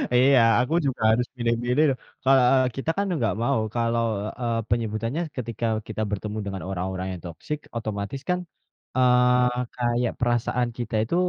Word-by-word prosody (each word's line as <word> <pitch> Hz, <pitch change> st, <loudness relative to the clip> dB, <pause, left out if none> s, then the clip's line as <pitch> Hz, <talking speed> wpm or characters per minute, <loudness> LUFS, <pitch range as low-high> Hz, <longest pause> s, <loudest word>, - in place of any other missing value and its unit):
Iya, 130 Hz, +1 st, +6 dB, 0.2 s
aku 125 Hz, +5 st, 0 dB
juga 135 Hz, -2 st, -2 dB
harus 120 Hz, +2 st, +1 dB
milih-milih 120 Hz, +4 st, +1 dB
loh. 130 Hz, -, 0 dB, 0.3 s
Ke 130 Hz, -, +1 dB
eee, 130 Hz, 0 st, +5 dB
kita 135 Hz, +4 st, -3 dB
kan 200 Hz, -, +1 dB
nggak 115 Hz, -7 st, +1 dB
mau 135 Hz, 0 st, +2 dB, 0.2 s
kalau, 115 Hz, 0 st, +1 dB, 0.4 s
eee, 115 Hz, -1 st, 0 dB
penyebutannya 115 Hz, +6 st, -1 dB, 0.2 s
ketika 115 Hz, -2 st, -3 dB, 0.2 s
kita 110 Hz, -1 st, -4 dB
bertemu 105 Hz, +1 st, -3 dB
dengan 95 Hz, -2 st, -4 dB
orang-orang 95 Hz, 0 st, -3 dB
yang 85 Hz, -, -14 dB
toksik, 90 Hz, -, -5 dB, 0.2 s
otomatis 110 Hz, +4 st, -4 dB
kan, 180 Hz, 0 st, +2 dB, 0.6 s
eee, 125 Hz, 0 st, +4 dB, 0.3 s
kayak 120 Hz, -1 st, 0 dB
perasaan 120 Hz, 0 st, +1 dB
kita 115 Hz, -2 st, -3 dB
itu, 115 Hz, -, -2 dB
120 Hz, 155 wpm, -25 LUFS, 110-125 Hz, 0.6 s, Iya